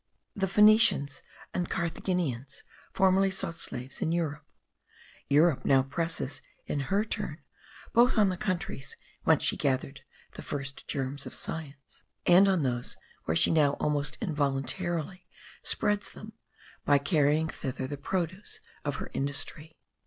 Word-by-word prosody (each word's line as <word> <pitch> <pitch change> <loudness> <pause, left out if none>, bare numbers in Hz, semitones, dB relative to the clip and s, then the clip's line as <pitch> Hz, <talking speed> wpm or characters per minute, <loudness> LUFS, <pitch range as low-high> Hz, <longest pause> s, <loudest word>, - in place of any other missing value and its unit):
The 195 -1 0
Phoenicians 210 -8 +5 0.3
and 175 -1 -1
Carthaginians 165 -6 -2 0.3
formerly 190 0 +4
sought 180 -3 -4
slaves 125 +1 -5
in 160 - +1
Europe. 160 -3 -1 0.9
Europe 150 +1 +4
now 135 -1 +4
presses 165 -1 -2 0.2
in 145 - -2
her 205 +2 +2
turn - - -3 0.6
both 240 +1 +5
on 205 -3 +5
the 185 - -1
countries 175 -7 -3 0.3
whence - - +4
she - - +2
gathered 135 0 -1 0.3
the - - -8
first 140 -1 -6
germs 140 0 -3
of - - -8
science, 145 -3 -6 0.2
and 185 +3 +7
on 185 -5 +2
those 125 -2 -2 0.3
where 80 - +1
she - - +5
now 150 -3 +4
almost 150 0 -1
involuntarily 165 - -2 0.3
spreads 205 0 0
them 215 +1 -11 0.5
by 145 - +5
carrying 150 +1 +2
thither 130 -4 -4
the 145 - -4
produce 180 +6 -3 0.2
of 145 -1 -2
her - - -6
industry. 145 +3 -2
155 Hz, 135 wpm, -29 LUFS, 140-185 Hz, 0.9 s, and